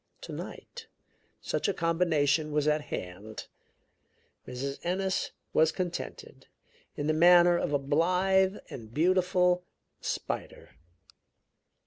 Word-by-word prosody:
Tonight 475 Hz, -2 st, -8 dB, 0.5 s
such -, -, -1 dB
a 200 Hz, -, 0 dB
combination 160 Hz, -3 st, +1 dB
was 150 Hz, 0 st, +1 dB
at 150 Hz, 0 st, +2 dB
hand. 105 Hz, -2 st, -7 dB, 1.0 s
Mrs. 135 Hz, +2 st, -4 dB
Ennis 190 Hz, +2 st, -1 dB, 0.2 s
was 160 Hz, 0 st, +4 dB
contented, 180 Hz, -1 st, -6 dB, 0.5 s
in 145 Hz, -, -3 dB
the 155 Hz, -, +2 dB
manner 175 Hz, +2 st, +6 dB
of 170 Hz, -, -1 dB
a 145 Hz, -, +3 dB
blithe 185 Hz, +7 st, +2 dB
and 110 Hz, -4 st, -9 dB
beautiful 180 Hz, -, +2 dB, 0.4 s
spider. -, -, -5 dB
165 Hz, 100 wpm, -29 LUFS, 145-180 Hz, 1.0 s, manner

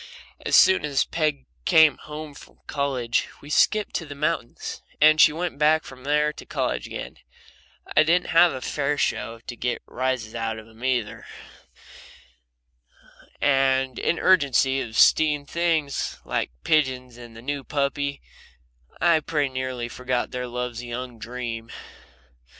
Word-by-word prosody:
As -, -, +2 dB
soon 190 Hz, -4 st, +6 dB
as 145 Hz, -2 st, +1 dB
Peg 155 Hz, -4 st, -1 dB, 0.2 s
came 160 Hz, -, +5 dB
home 150 Hz, 0 st, -8 dB
from -, -, -15 dB
college 130 Hz, -5 st, -1 dB
we 145 Hz, -, -11 dB
skipped 215 Hz, +6 st, +2 dB
to 165 Hz, -, -6 dB
the 145 Hz, -, -8 dB
mountains, 140 Hz, -, -3 dB, 0.2 s
and 155 Hz, +1 st, +6 dB
she -, -, +7 dB
went 165 Hz, -1 st, -4 dB
back 155 Hz, +1 st, +4 dB
from 130 Hz, 0 st, -12 dB
there 150 Hz, +1 st, +2 dB
to -, -, -10 dB
college -, -, -2 dB
again, -, -, -7 dB, 0.7 s
and -, -, -10 dB
I -, -, +7 dB
didn't 170 Hz, +3 st, +2 dB
have 170 Hz, 0 st, +6 dB
a 130 Hz, -, -6 dB
fair 145 Hz, +3 st, -1 dB
show 115 Hz, -4 st, -2 dB
to 120 Hz, -, -8 dB
get 120 Hz, +1 st, -3 dB
rises 130 Hz, -3 st, -2 dB
out 115 Hz, -1 st, -3 dB
of 110 Hz, -, -10 dB
them 110 Hz, 0 st, -19 dB
together, 125 Hz, -4 st, -2 dB, 2.1 s
and 135 Hz, -2 st, +2 dB
in -, -, +1 dB
the -, -, -6 dB
urgency 135 Hz, -6 st, +3 dB
of 110 Hz, -3 st, -5 dB
'steen 150 Hz, -2 st, +4 dB
things 160 Hz, -2 st, -1 dB
like -, -, -1 dB
pigeons 130 Hz, -5 st, +1 dB
and 120 Hz, -2 st, -12 dB
the -, -, -10 dB
new 140 Hz, +1 st, -3 dB
puppy, 140 Hz, 0 st, -2 dB, 0.8 s
I 170 Hz, -2 st, +4 dB
pretty 150 Hz, -2 st, -1 dB
nearly 130 Hz, -2 st, -4 dB
forgot 125 Hz, +1 st, -2 dB
their 125 Hz, 0 st, -4 dB
love's 125 Hz, -1 st, -4 dB
young 120 Hz, 0 st, -6 dB
dream. 115 Hz, -1 st, -6 dB
135 Hz, 150 wpm, -24 LUFS, 125-150 Hz, 2.1 s, she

